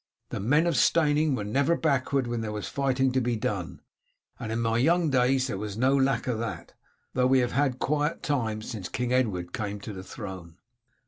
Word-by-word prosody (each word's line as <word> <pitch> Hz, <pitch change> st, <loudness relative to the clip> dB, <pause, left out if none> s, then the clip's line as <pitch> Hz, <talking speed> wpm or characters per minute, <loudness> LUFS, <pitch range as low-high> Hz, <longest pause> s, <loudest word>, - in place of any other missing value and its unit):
The -, -, -4 dB
men 145 Hz, -, +3 dB
of 170 Hz, -3 st, +1 dB
Steyning 150 Hz, -2 st, +3 dB
were 105 Hz, -, -3 dB
never 140 Hz, +10 st, +1 dB
backward 140 Hz, -3 st, +1 dB
when 120 Hz, -1 st, -2 dB
there 110 Hz, -1 st, -3 dB
was 105 Hz, -1 st, -4 dB
fighting 135 Hz, -1 st, +1 dB
to 130 Hz, +1 st, +1 dB
be 120 Hz, 0 st, 0 dB
done, 110 Hz, -, -3 dB, 0.6 s
and 115 Hz, -2 st, -5 dB
in 115 Hz, -, -1 dB
my 115 Hz, 0 st, +1 dB
young 165 Hz, +3 st, +3 dB
days 130 Hz, 0 st, +3 dB
there 105 Hz, -7 st, -3 dB
was 105 Hz, -1 st, -5 dB
no 130 Hz, +3 st, +3 dB
lack 135 Hz, -3 st, +2 dB
of 125 Hz, -4 st, -1 dB
that, 115 Hz, -1 st, -5 dB, 0.4 s
though 125 Hz, 0 st, +3 dB
we 130 Hz, +1 st, +4 dB
have 125 Hz, -1 st, +1 dB
had 135 Hz, -1 st, +1 dB
quiet 150 Hz, +4 st, -1 dB
times 110 Hz, -7 st, -1 dB
since 105 Hz, -7 st, -5 dB
King 125 Hz, 0 st, -1 dB
Edward 95 Hz, -9 st, 0 dB
came 105 Hz, -1 st, -3 dB
to 105 Hz, -, -7 dB
the 95 Hz, -, -7 dB
throne." 95 Hz, -4 st, -8 dB
125 Hz, 205 wpm, -27 LUFS, 110-140 Hz, 0.6 s, we